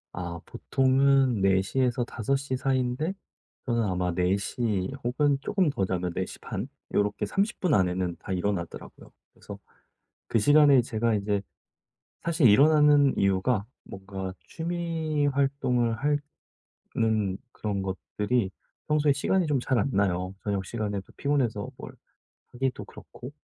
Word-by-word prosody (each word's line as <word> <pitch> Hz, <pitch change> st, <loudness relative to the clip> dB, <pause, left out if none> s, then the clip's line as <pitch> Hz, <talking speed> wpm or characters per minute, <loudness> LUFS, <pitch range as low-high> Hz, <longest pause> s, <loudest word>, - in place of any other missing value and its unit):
아 85 Hz, -1 st, -5 dB
보통은 135 Hz, -3 st, +2 dB
4:00 95 Hz, +5 st, +2 dB
에서 125 Hz, -1 st, +1 dB
5:00 135 Hz, +4 st, -2 dB
사이인데 130 Hz, +5 st, 0 dB, 0.5 s
저는 120 Hz, -3 st, +1 dB
아마 90 Hz, -3 st, -1 dB
4:00 95 Hz, +3 st, 0 dB
혹은 140 Hz, +4 st, +2 dB
쪼금 185 Hz, -1 st, +1 dB
더 100 Hz, -8 st, -1 dB
자면 90 Hz, -1 st, -2 dB
4 95 Hz, +1 st, -1 dB
시 -, -, -10 dB
반 -, -, -5 dB, 0.3 s
요렇게 105 Hz, 0 st, 0 dB
30 205 Hz, +4 st, -1 dB
분 180 Hz, -5 st, +1 dB
안에는 90 Hz, -2 st, +1 dB
다 -, -, -8 dB
일어나더라고요. 95 Hz, -1 st, -4 dB, 0.2 s
그래서 -, -, -10 dB, 0.7 s
그 -, -, +2 dB
시간에 145 Hz, +3 st, +6 dB
제가 115 Hz, -1 st, 0 dB
이제 100 Hz, -1 st, 0 dB, 0.8 s
사실 165 Hz, -5 st, +3 dB
일어나는 145 Hz, +3 st, +5 dB
이유가 100 Hz, +3 st, +1 dB, 0.2 s
뭔가 95 Hz, -1 st, -7 dB
취미 165 Hz, -3 st, -2 dB
활동을 135 Hz, -4 st, +1 dB, 1.0 s
하는 110 Hz, -4 st, 0 dB, 0.2 s
그런 100 Hz, -2 st, -3 dB
것들이 100 Hz, +3 st, -2 dB, 0.4 s
평소에 150 Hz, -1 st, +3 dB
시간이 175 Hz, +5 st, +1 dB
좀 145 Hz, -3 st, +1 dB
잘 125 Hz, 0 st, 0 dB
안 105 Hz, -, 0 dB
나요. 95 Hz, -3 st, 0 dB
저녁 100 Hz, -2 st, -1 dB
시간에도 105 Hz, -3 st, -4 dB
피곤해서 130 Hz, -8 st, 0 dB
뭘 -, -, -9 dB, 0.6 s
하기도 130 Hz, +1 st, -2 dB
그렇고 125 Hz, -, -11 dB
120 Hz, 255 characters per minute, -27 LUFS, 95-140 Hz, 1.0 s, 시간에